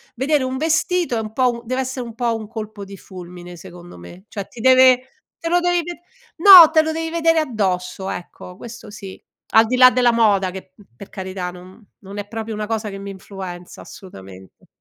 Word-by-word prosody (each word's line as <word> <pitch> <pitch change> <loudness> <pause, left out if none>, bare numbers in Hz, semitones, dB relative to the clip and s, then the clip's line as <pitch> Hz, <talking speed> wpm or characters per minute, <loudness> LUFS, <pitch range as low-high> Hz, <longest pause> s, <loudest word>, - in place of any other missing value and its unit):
Vedere 275 +2 0
un 260 0 -3
vestito 325 0 0
è 225 - -1
un 215 -1 -6
po' 255 +1 +1
un 235 0 -8
dev'essè 260 +2 -4
un 235 -2 -9
po' 235 -1 -1
un 215 -2 -7
colpo 215 -2 -8
di 195 0 -11
fulmine 180 -1 -11
secondo 175 - -13
me. 175 - -14
Cioè 200 -2 -7
ti 230 - -12
deve 260 0 +5 0.3
te 330 - -4
lo 350 +1 +3
devi 350 -1 0
ved 350 +1 -7 0.4
no, 345 -3 +10
te 315 -1 +4
lo 315 - -3
devi 325 0 -4
vedere 330 -1 +1
addosso, 195 -8 -3
ecco 180 +1 -9
questo 235 0 -11
sì. 200 -2 -11 0.3
Al 225 +1 +5
di 250 - -1
là 255 0 +8
della 245 -1 +3
moda, 205 -5 +2
che, 185 0 -11
mhmm, 205 - -20
per 200 - -12
carità, 185 -2 -6
non 180 +1 -14 0.2
non 200 +1 -11
è 205 0 -6
proprio 225 0 -6
una 210 - -4
cosa 220 0 -3
che 195 - -8
mi 200 0 -8
influenza 190 -2 -10
assolutamente. 95 - -14
220 Hz, 205 wpm, -20 LUFS, 190-260 Hz, 0.4 s, no